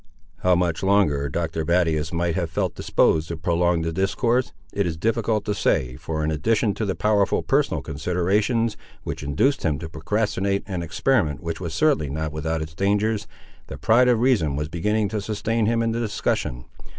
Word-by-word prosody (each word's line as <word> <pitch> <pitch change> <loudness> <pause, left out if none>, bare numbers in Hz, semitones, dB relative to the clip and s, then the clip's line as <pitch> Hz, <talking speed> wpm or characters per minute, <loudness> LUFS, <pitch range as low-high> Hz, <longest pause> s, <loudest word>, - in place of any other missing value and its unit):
How 90 -1 +3
much 85 -2 0
longer 95 -8 +2
Doctor 80 +1 -2
Battius 80 -2 +1
might 85 0 0
have 85 -2 -1
felt 80 - -1
disposed 80 0 +2
to 85 - -5
prolong 85 +1 +1
the 80 0 -2
discourse, 115 +7 +1 0.2
it 100 -2 0
is 80 -2 -3
difficult 110 +1 0
to 105 - 0
say, 70 -11 0
for 80 +3 -4
in 75 - 0
addition 100 +7 +1
to 110 - -3
the 95 - -1
powerful 105 -2 +2
personal - - +1
considerations, 100 - 0 0.3
which - - -5
induced 75 - +1
him 75 -5 0
to 80 +2 -6
procrastinate 100 +4 -1
an 95 -4 -4
experiment 80 - 0
which 85 -1 -4
was 85 -3 -4
certainly 140 - +2
not 75 +2 -3
without 80 +1 -2
its 80 0 -9
dangers, 105 +4 0 0.4
the - - -7
pride 125 +3 +4
of 120 -3 +4
reason 110 - +2
was 75 +1 -3
beginning 105 +6 0
to 105 +1 -2
sustain 110 +2 -1
him 115 0 +2
in 115 - 0
the 115 - -2
discussion. 100 - -2
90 Hz, 185 wpm, -23 LUFS, 80-105 Hz, 0.4 s, pride